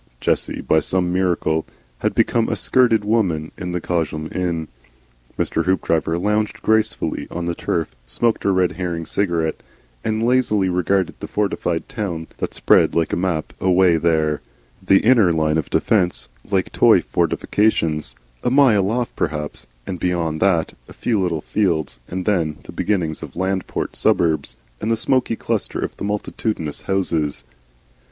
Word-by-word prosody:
Jessie - - -1
by 80 - +3
some 90 +2 0
miracle 90 -4 +1 0.4
had - - -1
become 115 -1 +2
a - - 0
skirted 115 -5 +3
woman 90 -8 +1
in 90 0 -5
the 90 - -1
Cosham 80 -2 -2
inn. 85 -3 -1 0.7
Mr. 80 - 0
Hoopdriver 85 -3 +1
lounged 105 +3 -1
gracefully 110 0 0
on 85 0 -4
the 85 - -1
turf, 85 -1 -2
smoked 110 - 0
a - - +2
Red 90 -1 +2
Herring 85 -2 -3
cigarette, 85 -2 -1 0.4
and 110 0 -1
lazily 115 -6 +2
regarded 90 +2 0
the - - -6
fortified 95 -5 -1
towns 85 -7 -4
that - - -3
spread - - +4
like 85 -1 +1
a - - +3
map 85 -3 -2
away 90 -2 +4
there, 80 -2 +1 0.4
the 95 - +5
inner 115 -7 +5
line 80 -1 +1
of 80 - -4
defence 90 - +1 0.2
like 95 -2 0
toy - - +5
fortifications, 80 - 0 0.3
a - - +2
mile 120 -8 +4
off 120 +1 -2
perhaps; 75 -2 -3 0.2
and 90 -2 -5
beyond 85 -3 -1
that 90 -4 +2 0.2
a - - -11
few 110 -5 0
little 85 -4 -1
fields 80 - -1
and 90 0 -4
then 80 -7 +1
the - - -10
beginnings 85 -7 -1
of - - -9
Landport 95 +1 -2
suburb 80 -4 +2 0.4
and 110 - -1
the 115 - +2
smoky 130 -1 +1
cluster - - -2
of - - -3
the - - -6
multitudinous 105 -5 -3
houses. 80 -9 -1
90 Hz, 155 wpm, -21 LUFS, 80-105 Hz, 0.7 s, the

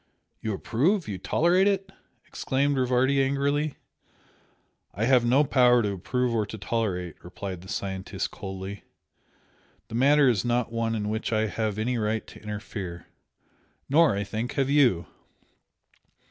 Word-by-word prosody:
"You 110 -2 -2
approve 165 - 0
you 95 -3 -4
tolerate 175 - +3
it?" 195 -1 0 0.3
exclaimed 140 +2 0
Rivardi 130 +1 +2
angrily. 140 +2 0 1.2
"I 105 +5 0
have 125 -1 +4
no 130 +5 +4
power 125 -3 +4
to 105 - 0
approve 125 +6 -1
or 110 -2 +1
to 105 +2 -7
tolerate" 100 -5 -3
replied 90 +1 -7
the 95 - -13
scientist, 95 0 -4
coldly 95 0 -7 1.1
"The - - -10
matter 140 +4 +5
is 115 -7 +2
not 120 -1 0
one 115 -1 -1
in 105 -1 -2
which 110 +2 -2
I 110 -1 +2
have 110 -1 -2
any 120 +3 -1
right 110 +1 -1
to - - -14
interfere. 105 -4 -6 0.8
Nor, 155 -4 +5
I 100 - -1
think, 110 +4 -4
have 135 -1 0
YOU! 125 - +4
115 Hz, 145 wpm, -26 LUFS, 100-135 Hz, 1.2 s, matter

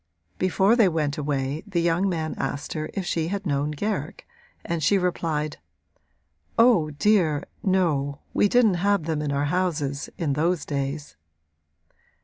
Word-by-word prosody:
Before 190 +4 +3
they 225 -6 +5
went 150 -3 -1
away 140 0 -2
the 190 -4 -1
young 170 +3 +2
man 160 -3 -2
asked 145 +1 -3
her 155 -1 -4
if 195 - -2
she 165 -2 -1
had 200 +2 -3
known 145 -2 0
Garrick 205 +9 -3 0.4
and 170 -1 -2
she 195 +7 +3
replied: 165 -4 -1 1.0
'Oh, 225 -10 +5
dear, 160 -2 +2 0.2
no, 155 -8 +1 0.2
we - - +4
didn't 215 -8 +3
have 200 -3 +2
them 155 -1 -2
in 150 -1 -2
our 140 +1 0
houses, 150 -4 -1
in 160 -7 0
those 165 +3 0
days.' 140 - -4
160 Hz, 145 wpm, -25 LUFS, 145-185 Hz, 1.0 s, they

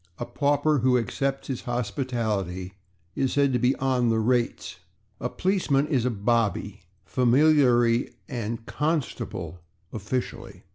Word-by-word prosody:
A - - -4
pauper 145 +3 +1
who 125 +1 +3
accepts 135 +4 -2
its 130 -3 -3
hospitality 110 - -2 0.4
is 135 -1 0
said 140 -2 +2
to 125 - +2
be 125 +3 +3
/on 130 -3 +1
the 115 - +2
rates/. 120 +2 0 0.4
A 125 - -2
policeman 175 -7 +1
is 130 -6 0
a - - +2
/bobby/ 105 -2 0 0.3
familiarly 125 -2 +3 0.2
and 115 -3 -4
/constable/ 150 - -3 0.3
officially. 110 +4 -4
125 Hz, 125 wpm, -26 LUFS, 115-135 Hz, 0.4 s, who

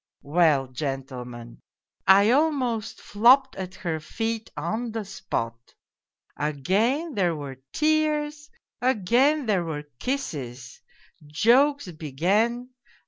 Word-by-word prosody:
" - - -67
Well, 150 -3 +3
gentlemen, 125 -3 -6 0.5
I 200 +3 +6
almost 255 -6 0
flopped 255 +6 +4
at 185 -1 -6
her 165 -4 -3
feet 225 +7 -4
on 220 +9 -3
the 225 -2 -4
spot. 125 - -5 0.6
Again 205 - 0
there 180 -6 +1
were 135 -3 -8
tears, 300 -1 0 0.3
again 255 +5 +2
there 200 -5 +1
were 155 -3 -4 0.2
kisses. 135 - -4 0.5
Jokes 245 - +3
began. 195 - 0
195 Hz, 100 wpm, -25 LUFS, -, 0.6 s, I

